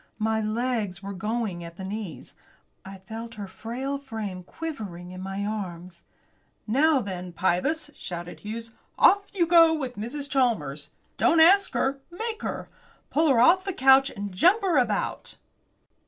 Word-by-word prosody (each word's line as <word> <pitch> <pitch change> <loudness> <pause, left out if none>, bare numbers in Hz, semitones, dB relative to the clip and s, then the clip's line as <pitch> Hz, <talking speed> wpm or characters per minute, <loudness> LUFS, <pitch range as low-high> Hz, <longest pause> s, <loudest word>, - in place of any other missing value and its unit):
My 220 0 0
legs 215 -4 -2
were 200 0 -5
going 210 -2 -3
at 170 0 -10
the 190 - -7
knees. 195 -3 -6 0.5
I 195 0 -9
felt 225 +4 -8
her 205 -1 -6
frail 255 +8 -4
frame 220 -9 -6
quivering 195 - -7
in 185 0 -8
my 195 +1 -4
arms. 180 -4 -5 0.6
"Now, 275 +5 +3
then, 185 -4 -6
Pybus," 230 - 0
shouted 175 -1 -7
Hughes, 225 +2 -7 0.3
"off 400 0 +5
you 365 -4 +1
go 330 -1 +6
with 260 -6 -5
Mrs. 270 +7 -5
Chalmers. 175 - 0 0.3
Don't 330 - +4
ask 385 +5 +6
her; 275 +1 0
make 440 +5 -5
her. - - -4 0.4
Pull 315 +2 +3
her 255 -4 +4
off 345 +10 +6
the 390 -1 -3
couch 270 -1 +5
and 200 -1 -6
jump 365 - +4
her 345 -7 +3
about!" 220 -5 -2
225 Hz, 155 wpm, -26 LUFS, 190-280 Hz, 0.6 s, go